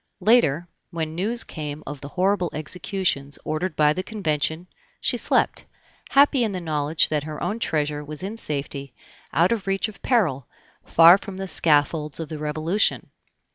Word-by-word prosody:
Later, 180 Hz, -, +3 dB, 0.2 s
when 160 Hz, -2 st, -4 dB
news 215 Hz, +8 st, -1 dB
came 150 Hz, -1 st, -7 dB
of 145 Hz, -2 st, -7 dB
the 140 Hz, -, -7 dB
horrible 185 Hz, +2 st, 0 dB
executions 155 Hz, -3 st, -1 dB
ordered 155 Hz, +1 st, -2 dB
by 150 Hz, 0 st, +4 dB
the 185 Hz, -, -3 dB
Convention, 160 Hz, -5 st, -2 dB, 0.3 s
she -, -, 0 dB
slept, -, -, +1 dB, 0.4 s
happy 275 Hz, -2 st, +4 dB
in 215 Hz, -3 st, -1 dB
the 185 Hz, -, -3 dB
knowledge 155 Hz, -2 st, +1 dB
that 150 Hz, -2 st, -1 dB
her 155 Hz, -1 st, -6 dB
own 215 Hz, +2 st, -2 dB
treasure 150 Hz, -6 st, -1 dB
was 150 Hz, +3 st, -5 dB
in 200 Hz, +3 st, -4 dB
safety, 140 Hz, -, -3 dB, 0.4 s
out 170 Hz, +5 st, +3 dB
of 215 Hz, -4 st, -2 dB
reach 195 Hz, +3 st, +1 dB
of 215 Hz, -, -10 dB
peril, 165 Hz, -, +1 dB, 0.4 s
far 170 Hz, +3 st, +7 dB
from 195 Hz, -2 st, -8 dB
the 195 Hz, 0 st, -4 dB
scaffolds 150 Hz, -2 st, +1 dB
of 160 Hz, -3 st, -5 dB
the 155 Hz, -, -6 dB
Revolution. 155 Hz, +6 st, -1 dB
160 Hz, 165 wpm, -23 LUFS, 150-195 Hz, 0.4 s, far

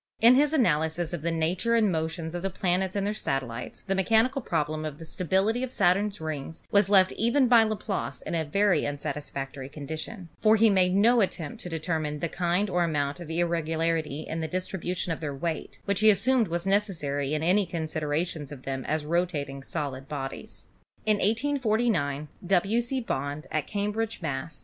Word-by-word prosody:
In 235 Hz, +2 st, +8 dB
his 290 Hz, +3 st, +4 dB
analysis 165 Hz, -, +1 dB
of 170 Hz, -, -3 dB
the 170 Hz, -, -1 dB
nature 170 Hz, +8 st, +1 dB
and 215 Hz, -4 st, +3 dB
motions 160 Hz, 0 st, -2 dB
of 175 Hz, -, -3 dB
the 195 Hz, -, -1 dB
planets 185 Hz, +1 st, 0 dB
and 200 Hz, -1 st, 0 dB
their 205 Hz, -, 0 dB
satellites 130 Hz, -, -3 dB
the 195 Hz, -, -2 dB
mechanical 225 Hz, +8 st, +2 dB
problem 155 Hz, -6 st, -1 dB
of 150 Hz, -2 st, -5 dB
the 165 Hz, -, -9 dB
stability 190 Hz, +8 st, 0 dB
of 260 Hz, -1 st, -3 dB
Saturn's 200 Hz, +2 st, +2 dB
rings 155 Hz, 0 st, -5 dB
was 200 Hz, -1 st, +4 dB
left 190 Hz, -2 st, +5 dB
even 245 Hz, +4 st, +2 dB
by 235 Hz, -1 st, +7 dB
Laplace 210 Hz, -, -2 dB
in -, -, -5 dB
a 165 Hz, -1 st, +1 dB
very 200 Hz, +6 st, +2 dB
unsatisfactory 140 Hz, -2 st, -5 dB
condition; 160 Hz, +6 st, -6 dB
for 215 Hz, 0 st, +6 dB
he 220 Hz, 0 st, +5 dB
made 185 Hz, -1 st, +3 dB
no 230 Hz, +4 st, +5 dB
attempt 170 Hz, -6 st, -2 dB
to 180 Hz, -, -6 dB
determine 160 Hz, -2 st, -2 dB
the 170 Hz, -, -2 dB
kind 180 Hz, +4 st, 0 dB
or 180 Hz, -2 st, +1 dB
amount 145 Hz, -1 st, -1 dB
of 170 Hz, -3 st, -8 dB
irregularity 165 Hz, -2 st, 0 dB
in 160 Hz, +1 st, -4 dB
the 160 Hz, -, -2 dB
dis 185 Hz, +3 st, -2 dB
tribution 180 Hz, -1 st, -2 dB
of -, -, -6 dB
their 145 Hz, -3 st, -4 dB
weight, 160 Hz, +3 st, -4 dB
which 200 Hz, -2 st, 0 dB
he 215 Hz, +1 st, +6 dB
assumed 235 Hz, +2 st, +3 dB
was 170 Hz, +1 st, -2 dB
necessary 155 Hz, -8 st, 0 dB
in 155 Hz, -, -2 dB
any 190 Hz, +3 st, +3 dB
considerations 155 Hz, -2 st, -2 dB
of 135 Hz, -3 st, -9 dB
them 135 Hz, -1 st, -3 dB
as 155 Hz, -1 st, -1 dB
rotating 150 Hz, -5 st, -1 dB
solid 135 Hz, -1 st, -4 dB
bodies. 135 Hz, -2 st, -6 dB, 0.4 s
In 215 Hz, -1 st, +3 dB
1849 220 Hz, -, +1 dB, 0.2 s
W. 195 Hz, +5 st, +3 dB
C. 255 Hz, +2 st, -2 dB
Bond 145 Hz, -, -3 dB
at 155 Hz, -2 st, -1 dB
Cambridge, 210 Hz, +2 st, -2 dB
Mass. 145 Hz, -2 st, -4 dB
170 Hz, 185 wpm, -27 LUFS, 150-205 Hz, 0.4 s, In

